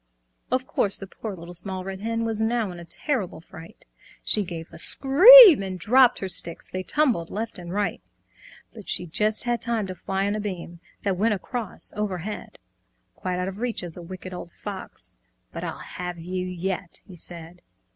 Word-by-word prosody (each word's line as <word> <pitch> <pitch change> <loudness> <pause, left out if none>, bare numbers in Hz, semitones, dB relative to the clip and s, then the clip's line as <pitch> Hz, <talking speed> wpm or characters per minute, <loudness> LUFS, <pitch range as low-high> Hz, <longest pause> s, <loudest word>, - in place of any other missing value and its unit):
Of 255 +1 -1
course 200 -5 +1
the 195 - -3
poor 200 +1 -8
Little 170 0 -11
Small 185 +1 -2
Red 190 0 -7
Hen 230 +1 -2
Was 220 -1 -2
now 225 -3 0
in 175 - -10
a 170 - -10
terrible 200 - 0
fright. 165 0 -14 0.4
She 210 - +4
gave 170 -3 -7
a - - -10
scream 370 - +9
and 190 -1 -5
dropped 250 +7 +4
her 190 - -4
sticks, 170 -2 +1
They 185 - -5
tumbled 230 - +1
left 220 -1 -5
and 175 -1 -8
right. 205 +2 -2 0.7
But 215 -4 -12
she 180 - -2
just 210 +7 +1
had 240 -1 -1
time 230 -4 0
to 185 - -6
fly 190 +2 -3
on 205 - -1
a - - -3
beam 180 -4 -6 0.2
That 195 -3 -1
went 210 +2 +2
across 230 +2 -6
over 205 -3 -3
head, 210 +5 -8 0.6
Quite 180 -1 -4
out 180 +1 -2
of 195 +1 -7
reach 240 -4 -3
of 175 -2 -7
the 175 - -10
Wicked 185 +1 -9
Old 175 -1 -8
Fox. - - -8 0.4
"But - - -7
I'll - - -5
have 180 -1 -7
you 180 +2 -4
yet," 180 0 -5
he 185 - -13
said. 170 0 -11
190 Hz, 195 wpm, -24 LUFS, 180-225 Hz, 0.7 s, scream